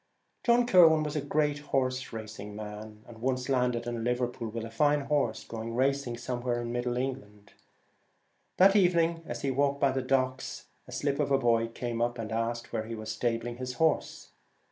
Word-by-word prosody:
John 240 0 +4
Kirwan 165 -8 +6
was 150 0 -4
a 150 - 0
great 145 0 0
horse 130 -3 -1
racing 110 -2 -7
man, 105 0 -8
and 115 -1 -12
once 130 +1 -1
landed 125 -3 +1
in 120 -1 -3
Liverpool 120 -1 -1
with 115 +1 -5
a 115 - -8
fine 145 +5 +3
horse, 140 -5 0
going 115 0 -6
racing 135 -1 0
somewhere 120 0 -2
in 120 - -4
middle 120 0 -1
England. 105 -6 -5 1.0
That 195 +2 +6
evening, 170 -4 +3
as - - -5
he 135 - +1
walked 140 +1 +1
by 140 -1 +3
the 130 0 -1
docks, 130 0 -1 0.2
a - - -11
slip 140 0 -1
of 145 - +1
a 135 - +4
boy 115 -3 +2
came 115 0 -4
up 120 +1 0
and 110 -2 -5
asked 115 +1 -2
where 110 - -1
he 115 +1 -5
was 110 0 -5
stabling 120 +1 -2
his 130 0 -4
horse. 160 +2 0
125 Hz, 190 wpm, -29 LUFS, 115-140 Hz, 1.0 s, Kirwan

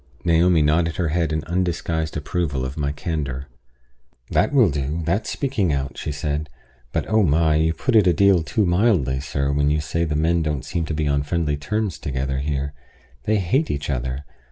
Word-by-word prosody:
Naomi 85 -1 +4
nodded 80 +2 +2
her 85 -4 0
head 80 0 0
in 80 -1 -1
undisguised 85 -2 -1
approval 75 -3 -2
of 65 +2 -5
my 70 -2 -1
candor. 75 -4 -3 0.9
"That 90 +8 +2
will 125 - +4
do, 75 +4 -2
that's 100 +7 0
speaking 125 - 0
out," 70 -1 -2
she - - -4
said. 75 +1 -3 0.4
"But - - -1
oh 110 0 +3
my! 80 -2 +3
you 80 +1 +2
put 130 - 0
it 105 -4 +6
a - - +6
deal 100 0 +4
too 105 +6 0
mildly, 85 - +2
sir, 70 0 -1
when 70 0 +2
you 75 +1 +2
say 80 +2 -1
the 75 -2 -1
men 80 +2 +2
don't 75 -3 -2
seem 85 -2 -2
to 80 - -3
be 75 -1 0
on 70 0 +2
friendly 75 0 -1
terms 100 +5 -2
together 65 0 -2
here. 70 0 -2 0.5
They 110 - +2
hate 105 - +1
each 70 0 -2
other. 65 +2 -3
80 Hz, 195 wpm, -22 LUFS, 70-85 Hz, 0.9 s, it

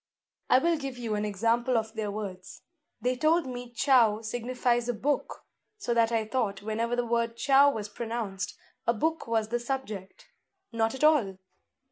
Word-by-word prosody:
"I - - +7
will 335 +5 +2
give 275 -4 -5
you 230 -3 -3
an 210 0 -1
example 230 +4 +1
of 220 -1 -2
their 220 -2 -3
words. 200 -3 -7 0.4
They 250 +1 +1
told 315 +4 +2
me 245 -1 -6
chou 235 -4 +3
signifies 240 +1 -1
a 245 - 0
book: 285 +5 -2 0.3
so 305 - -1
that 230 0 +3
I 225 -1 +1
thought 215 -4 -2
whenever 225 +3 -1
the 245 0 0
word 235 0 0
chou 275 +3 +5
was 215 -6 -3
pronounced, 215 -3 -4 0.3
a 235 - +3
book 320 +7 -1
was 225 -2 0
the 240 +1 0
subject. 240 -7 -5 0.4
Not 225 +1 0
at 265 - -5
all! 260 -12 +4
235 Hz, 170 wpm, -28 LUFS, 220-255 Hz, 0.4 s, I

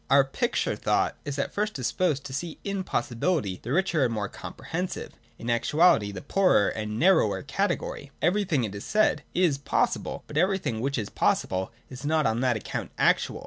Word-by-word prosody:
Our 140 0 +6
picture 135 - -1
thought - - +1
is 145 -1 -4
at 140 - -2
first 210 +1 -1
disposed 140 +2 0
to 130 - -7
see 160 +4 -4
in 200 -1 -2
possi 120 -7 -2
bility 120 - 0
the 120 - -5
richer 170 -2 +2
and 125 - +1
more 105 -2 -2
comprehensive, 180 +2 -5 0.2
in 115 - -8
actuality 120 - +3
the 100 - -7
poorer 180 - +3
and 105 0 -4
narrower 180 +2 +3
category. 170 -3 -2
Everything, 175 -6 +1
it 105 -3 -3
is 100 - -6
said, 215 0 +2
is 170 -6 +3
possible, 140 - -1
but 150 - -6
everything 185 - +1
which 135 +3 -1
is 110 -4 -3
possible 95 +4 0 0.2
is 130 +1 -8
not 155 +1 +2
on 110 +1 +1
that 125 -3 +2
account - - -5
actual. - - +2
140 Hz, 185 wpm, -27 LUFS, 115-180 Hz, 0.2 s, Our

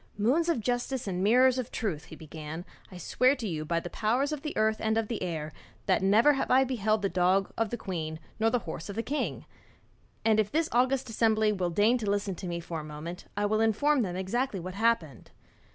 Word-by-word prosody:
'Moons 275 +11 +2
of 330 - +2
justice 245 +1 -2
and 185 -1 -1
mirrors 255 +4 +5
of 250 -1 -4
truth,' 185 -10 -3
he - - -11
began. 160 +2 -8 0.3
'I 180 - -9
swear 255 - +2
to 235 -5 -4
you 155 -4 -3
by 170 +2 0
the 170 - -7
powers 245 +7 0
of 300 -2 -3
earth 220 0 +2
and 220 0 0
of 225 0 -1
air 155 -4 -3 0.3
that - - +2
never 215 +10 +5
have 270 - -2
I 260 +1 +5
beheld 220 -5 0
the - - +3
dog 185 +1 +1
of 225 -1 0
the 240 - -3
queen 160 -6 -4 0.2
nor 225 +1 +3
the 245 - +2
horse 165 +3 -6
of 200 - -5
the 230 - -2
king. 295 +5 -3 0.8
And 220 -1 +4
if 210 -1 +1
this 320 +1 +1
august 255 +2 +2
assembly 220 -1 +3
will 185 -4 -1
deign 210 +8 +3
to 215 -3 -2
listen 205 -1 0
to 185 - -6
me 170 -1 -3
for 165 -1 -5
a - - -7
moment, 155 +4 -7
I 205 - +1
will 215 +1 +1
inform 255 +6 +3
them 180 -5 -2
exactly 195 +4 -1
what 185 +2 -6
happened. 210 -8 0
215 Hz, 220 wpm, -29 LUFS, 180-245 Hz, 0.8 s, mirrors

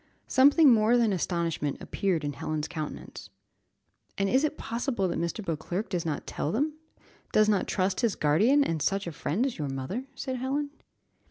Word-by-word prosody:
Something 280 +1 +6
more 225 +2 +4
than 230 -4 +3
astonishment 170 -5 -1
appeared 185 -6 -1
in 145 0 -2
Helen's 155 +2 -3
countenance. 155 -3 -7 0.9
"And 195 - +1
is 260 +6 +3
it 305 0 -1
possible 235 -4 -2
that 170 - -2
Mr. 170 +5 -3
Beauclerc 170 +5 -3
does 175 -3 -2
not 150 - -3
tell 150 - -3
them, 295 +8 0 0.6
does 215 0 +4
not 205 -3 +2
trust 185 -1 0
his 230 -4 +1
guardian 215 - +4
and 165 - -2
such 195 +5 0
a 170 - -4
friend 180 - -1
as 265 -9 -3
your 145 -2 -2
mother?" 135 - -4
said 260 -2 -4
Helen. 280 +3 -2
195 Hz, 175 wpm, -28 LUFS, 165-250 Hz, 0.9 s, Something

